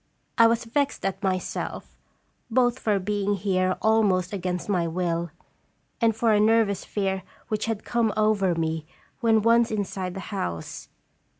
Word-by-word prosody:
I 230 Hz, -1 st, +7 dB
was 230 Hz, +1 st, +1 dB
vexed 280 Hz, +5 st, -1 dB
at 195 Hz, 0 st, -2 dB
myself, 185 Hz, -2 st, -3 dB, 0.5 s
both 245 Hz, +1 st, +2 dB
for 210 Hz, -2 st, +1 dB
being 205 Hz, +1 st, -1 dB
here 185 Hz, -1 st, 0 dB
almost 210 Hz, -5 st, +2 dB
against 180 Hz, -2 st, -3 dB
my 180 Hz, -5 st, +1 dB
will, 170 Hz, 0 st, -1 dB, 0.7 s
and 225 Hz, -2 st, +3 dB
for 225 Hz, 0 st, +2 dB
a 210 Hz, -, +4 dB
nervous 215 Hz, -2 st, +3 dB
fear 190 Hz, -2 st, -2 dB, 0.3 s
which 215 Hz, 0 st, -1 dB
had 220 Hz, -2 st, -3 dB
come 235 Hz, -2 st, +1 dB
over 210 Hz, -4 st, +2 dB
me 160 Hz, -1 st, -2 dB, 0.3 s
when 225 Hz, -3 st, +3 dB
once 230 Hz, +1 st, +4 dB
inside 195 Hz, -3 st, -3 dB
the -, -, -4 dB
house. 85 Hz, -, -4 dB
205 Hz, 145 wpm, -25 LUFS, 185-225 Hz, 0.7 s, I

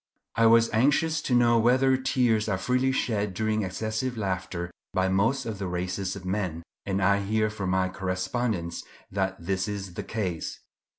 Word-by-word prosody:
I 115 Hz, 0 st, +5 dB
was 115 Hz, 0 st, +5 dB
anxious 150 Hz, +6 st, +2 dB
to 125 Hz, -, 0 dB
know 120 Hz, -1 st, +5 dB
whether 130 Hz, +3 st, +4 dB
tears 125 Hz, -5 st, +1 dB
are 95 Hz, -, +1 dB
freely 125 Hz, +6 st, +1 dB
shed 105 Hz, -7 st, -1 dB
during 110 Hz, +2 st, 0 dB
excessive 110 Hz, +6 st, -2 dB
laughter 95 Hz, -3 st, -3 dB, 0.2 s
by 95 Hz, 0 st, +2 dB
most 115 Hz, +8 st, +1 dB
of 110 Hz, -4 st, -4 dB
the 95 Hz, -, -2 dB
races 90 Hz, +2 st, -2 dB
of 95 Hz, -2 st, -9 dB
men, 90 Hz, -4 st, -2 dB, 0.2 s
and 95 Hz, -1 st, 0 dB
I 100 Hz, +1 st, +4 dB
hear 110 Hz, +2 st, 0 dB
from 100 Hz, -3 st, -3 dB
my 95 Hz, 0 st, +2 dB
correspondents 95 Hz, 0 st, -2 dB, 0.3 s
that 95 Hz, -1 st, -1 dB
this 95 Hz, +4 st, -1 dB
is 100 Hz, -3 st, -5 dB
the -, -, -4 dB
case. 95 Hz, -7 st, -3 dB
100 Hz, 170 wpm, -27 LUFS, 95-115 Hz, 0.3 s, I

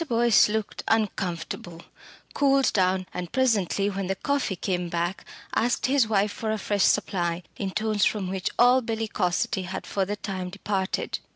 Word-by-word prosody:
Boyce 235 Hz, -3 st, +5 dB
looked 215 Hz, -1 st, -3 dB
uncomfortable, 175 Hz, -5 st, -2 dB, 0.5 s
cooled 275 Hz, -1 st, +3 dB
down, 185 Hz, -1 st, +2 dB
and 180 Hz, -1 st, -5 dB
presently 215 Hz, -6 st, +1 dB
when 195 Hz, -2 st, -2 dB
the 195 Hz, -, -1 dB
coffee 280 Hz, -3 st, -1 dB
came 180 Hz, -1 st, -2 dB
back 170 Hz, +2 st, -2 dB, 0.3 s
asked 240 Hz, +1 st, +1 dB
his 265 Hz, -3 st, +3 dB
wife 205 Hz, -1 st, +2 dB
for 220 Hz, +1 st, -4 dB
a 220 Hz, -, 0 dB
fresh 205 Hz, 0 st, -1 dB
supply 175 Hz, -2 st, +1 dB
in 195 Hz, -, -2 dB
tones 215 Hz, +1 st, 0 dB
from 205 Hz, -4 st, +1 dB
which 190 Hz, 0 st, -2 dB
all 250 Hz, +2 st, +6 dB
bellicosity 215 Hz, -4 st, -1 dB
had 190 Hz, +2 st, -5 dB
for 195 Hz, -, -1 dB
the 205 Hz, +2 st, -2 dB
time 190 Hz, -3 st, -5 dB
departed. 190 Hz, 0 st, -2 dB
200 Hz, 160 wpm, -26 LUFS, 185-225 Hz, 0.5 s, all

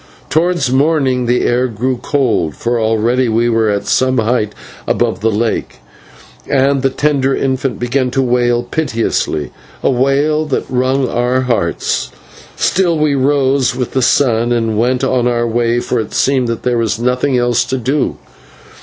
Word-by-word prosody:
Towards 160 Hz, -4 st, +1 dB
morning 135 Hz, -3 st, +1 dB
the 125 Hz, +1 st, +2 dB
air 125 Hz, +1 st, +1 dB
grew 125 Hz, +3 st, -2 dB
cold, 120 Hz, -, 0 dB
for 120 Hz, 0 st, -1 dB
already 115 Hz, +3 st, +1 dB
we 115 Hz, +2 st, +1 dB
were 115 Hz, -1 st, +1 dB
at 100 Hz, -1 st, -1 dB
some 130 Hz, 0 st, +1 dB
height 110 Hz, -2 st, 0 dB, 0.3 s
above -, -, 0 dB
the 110 Hz, +3 st, +1 dB
lake, 110 Hz, +1 st, -2 dB, 0.7 s
and 135 Hz, 0 st, +2 dB
the 135 Hz, -, +2 dB
tender 135 Hz, -1 st, 0 dB
infant 135 Hz, 0 st, -1 dB
began 125 Hz, +1 st, 0 dB
to 135 Hz, +2 st, 0 dB
wail 120 Hz, -1 st, +1 dB
piteously 115 Hz, -, -2 dB, 0.3 s
a -, -, +3 dB
wail 140 Hz, +4 st, +1 dB
that 140 Hz, -, -1 dB
wrung 130 Hz, +1 st, 0 dB
our 125 Hz, +2 st, 0 dB
hearts. 115 Hz, -10 st, -1 dB, 0.5 s
Still 175 Hz, -3 st, +1 dB
we 150 Hz, -1 st, +1 dB
rose 135 Hz, -1 st, +1 dB
with 125 Hz, -1 st, -3 dB
the 130 Hz, -, 0 dB
sun 120 Hz, -2 st, +2 dB
and 115 Hz, -2 st, 0 dB
went 125 Hz, +4 st, 0 dB
on 130 Hz, -2 st, +1 dB
our 120 Hz, -1 st, 0 dB
way, 120 Hz, +1 st, 0 dB
for 120 Hz, 0 st, -2 dB
it 110 Hz, -, -5 dB
seemed 130 Hz, -2 st, +1 dB
that 115 Hz, -1 st, -4 dB
there 125 Hz, -1 st, 0 dB
was 110 Hz, -1 st, 0 dB
nothing 125 Hz, +3 st, 0 dB
else 120 Hz, 0 st, +2 dB
to 130 Hz, -, -2 dB
do. 135 Hz, +4 st, -1 dB
125 Hz, 165 wpm, -15 LUFS, 120-135 Hz, 0.7 s, a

